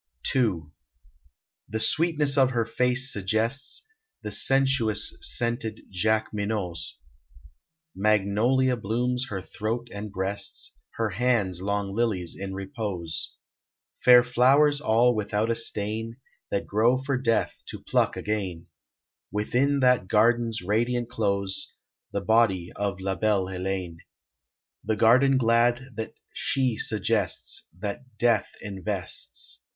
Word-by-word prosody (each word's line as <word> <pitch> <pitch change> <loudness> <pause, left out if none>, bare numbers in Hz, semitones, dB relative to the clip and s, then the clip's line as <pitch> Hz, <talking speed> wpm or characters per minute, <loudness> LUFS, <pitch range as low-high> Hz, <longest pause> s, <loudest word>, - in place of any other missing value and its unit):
II. 105 -11 +2 1.1
The 110 - -2
sweetness 155 0 +3
of 135 -2 +5
her 120 -3 0
face 125 +3 +1
suggests 110 - -2 0.4
The - - -4
sensuous 135 -6 +2
scented 115 -2 -2
Jacqueminots; 105 -3 -1 1.0
Magnolia 110 +6 +2
blooms 125 +4 -1
her 100 - -3
throat 115 +3 -4
and 100 0 -6
breasts; 95 -7 -3 0.2
Her 110 -2 -1
hands 100 -4 0
long 100 0 -2
lilies 100 -6 -1
in 95 0 -6
repose: 95 - -4 0.7
Fair 125 -1 +8
flowers 135 +4 +4
all 120 0 +4
without 105 +1 -1
a - - +1
stain, 115 +1 -2 0.3
That 100 - -1
grow 115 +5 +3
for 135 +1 -2
Death 115 -3 0
to - - -8
pluck - - +1
again, 95 -5 -3 0.7
Within 130 +8 +1
that 125 -6 +3
garden's 115 0 +2
radiant 120 +4 0
close, 100 -4 -1 0.4
The 100 - -2
body 100 -5 +2
of 100 -2 -2
La 95 0 -1
belle 100 0 +1
Heléne; 95 -2 -4 0.9
The 110 - 0
garden 130 +5 +5
glad 120 +2 +2
that 110 0 -6 0.2
she 130 -4 0
suggests, 105 -3 -1
That 110 +5 -6
Death 120 +1 +2 0.2
invests. 95 - -3
110 Hz, 115 wpm, -26 LUFS, 100-125 Hz, 1.1 s, Fair